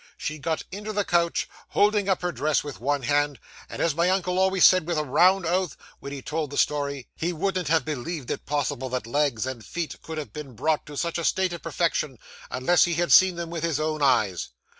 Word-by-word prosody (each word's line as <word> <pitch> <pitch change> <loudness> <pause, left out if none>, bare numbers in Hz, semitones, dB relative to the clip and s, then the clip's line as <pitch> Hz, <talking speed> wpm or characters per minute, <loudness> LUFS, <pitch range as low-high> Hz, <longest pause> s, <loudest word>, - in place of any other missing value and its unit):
She 155 0 -4
got 160 +3 -2
into 210 +3 -5
the 205 0 0
coach, 170 -1 +1 0.2
holding 205 -1 +2
up 185 -2 +1
her 180 - 0
dress 155 -2 0
with 145 -2 -7
one 140 +1 0
hand; 145 +1 +1 0.3
and - - -3
as 165 - +2
my 170 +4 +2
uncle 185 -1 +1
always 190 -1 +4
said 185 -3 +5
with 170 -2 -1
a 155 - +1
round 180 +6 +4
oath, 180 -1 0 0.2
when 140 - -8
he 140 -2 -7
told 155 -1 -2
the 145 - -6
story, 140 -3 0
he 170 +2 -1
wouldn't 185 0 -1
have 160 -3 +2
believed 150 -1 -4
it - - -5
possible 140 -3 -1
that 125 -2 -3
legs 130 -2 0
and 130 -4 -5
feet 170 +4 -5
could 160 -1 -7
have 155 - -6
been 145 -5 -8
brought 155 +7 0
to 145 -1 -8
such 170 +2 -1
a - - -3
state 185 +1 +1
of 170 - -6
perfection 150 -6 -1 0.3
unless 160 +7 +3
he 170 -1 -1
had 175 +1 0
seen 185 -1 +7
them 170 -1 -5
with 170 -2 -4
his 165 -3 0
own 155 0 -1
eyes. 110 -10 +2
155 Hz, 225 wpm, -25 LUFS, 145-175 Hz, 0.3 s, seen